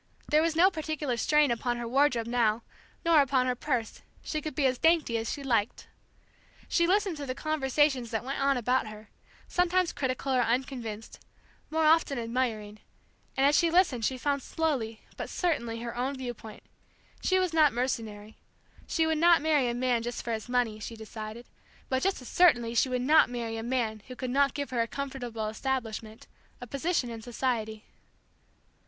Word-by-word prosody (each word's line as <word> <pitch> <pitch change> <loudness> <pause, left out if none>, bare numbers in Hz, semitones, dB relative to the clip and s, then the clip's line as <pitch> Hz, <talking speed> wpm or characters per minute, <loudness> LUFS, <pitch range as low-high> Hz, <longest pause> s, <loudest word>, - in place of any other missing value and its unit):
There 305 +1 +4
was 325 0 0
no 365 +4 +5
particular 310 -5 -3
strain 300 +3 +3
upon 240 +1 -1
her 240 -1 -4
wardrobe 255 -2 +2
now, 230 -1 +1 0.4
nor 330 -3 +6
upon 265 -2 +2
her 250 - +1
purse; 250 -3 -3 0.2
she 310 - -3
could 305 -2 -6
be 290 - +1
as 255 -1 +1
dainty 325 -7 +3
as 225 0 -2
she 285 - -5
liked. 230 -5 0 0.8
She 340 -1 +2
listened 390 -2 +1
to 285 -1 -6
the 255 - -3
conversations 275 -4 +1
that 225 0 -2
went 270 +2 -4
on 275 -1 +3
about 250 0 +1
her, 215 0 -11 0.4
sometimes 360 0 +1
critical 260 0 -2
or 255 - +3
unconvinced; 235 -3 -3 0.5
more 320 0 +1
often 310 -3 +4
admiring; 230 -3 -2 0.6
and 270 - +4
as 290 +1 +4
she 340 +1 +4
listened 330 -9 +2
she 260 +3 0
found 280 +2 -1
slowly 255 -9 -2 0.2
but - - -5
certainly 235 -10 -1
her 235 0 -5
own 260 +3 -2
viewpoint. 240 -4 -8 0.6
She 375 - +2
was 370 -3 0
not 310 -3 +5
mercenary. 220 -4 -3 0.5
She 325 - +1
would 320 -1 0
not 340 0 +6
marry 295 -4 +2
a 235 - -2
man 245 -1 +1
just 240 +1 -5
for 235 - -2
his 220 +2 -5
money, 245 -4 0
she 230 +2 -7
decided, 220 +1 -8 0.4
but 260 0 0
just 390 +1 0
as - - -10
certainly 240 -10 +4
she 240 +3 +2
would 250 -1 -1
not 305 0 +5
marry 235 -2 -4
a 225 - -4
man 230 -3 -2
who 255 - -8
could 250 0 -4
not 280 +1 +2
give 285 -2 -4
her 240 -2 +1
a 230 - 0
comfortable 245 -5 -4
establishment, 220 -2 -4 0.3
a 245 - -7
position 275 0 -1
in 225 -1 -7
society. 225 -2 -2
255 Hz, 185 wpm, -29 LUFS, 230-295 Hz, 0.8 s, nor